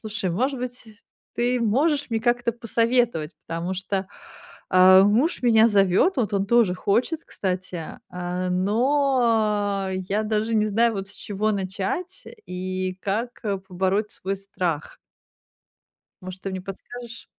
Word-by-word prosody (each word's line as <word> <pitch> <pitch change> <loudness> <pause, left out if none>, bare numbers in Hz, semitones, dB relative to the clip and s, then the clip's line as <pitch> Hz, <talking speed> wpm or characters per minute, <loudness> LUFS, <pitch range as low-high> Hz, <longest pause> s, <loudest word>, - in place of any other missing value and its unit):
слушай, 215 -4 -2
может 260 +8 0
быть, 250 0 -6 0.5
ты 245 +1 +1
можешь 280 +7 +1
мне 225 -1 0
как-то 240 0 +1
посоветовать, 230 -7 0
потому 170 +3 -3
что, 190 +1 -3 0.6
э, 185 +1 +8
муж 240 - +2
меня 225 -2 +6
зовёт, 200 - +3
вот 225 -4 0
он 195 0 +1
тоже 230 -5 +4
хочет, 240 - 0
кстати, 180 -3 -4
э, 180 0 -3
но, 215 -2 +1
я 190 +3 -1
даже 215 +1 -1
не 215 -1 +2
знаю, 230 +3 +3
вот, 195 0 -4
с - - -8
чего 210 +1 -1
начать 200 - -3 0.2
и 185 0 -4
как 225 +5 -2 0.3
побороть 190 +3 0
свой 195 +1 -4
страх. 180 -5 -3 1.3
Может, 185 0 -8
ты 195 - -4
мне 185 - -4
подскажешь? 235 +5 -9
205 Hz, 130 wpm, -24 LUFS, 185-235 Hz, 1.3 s, э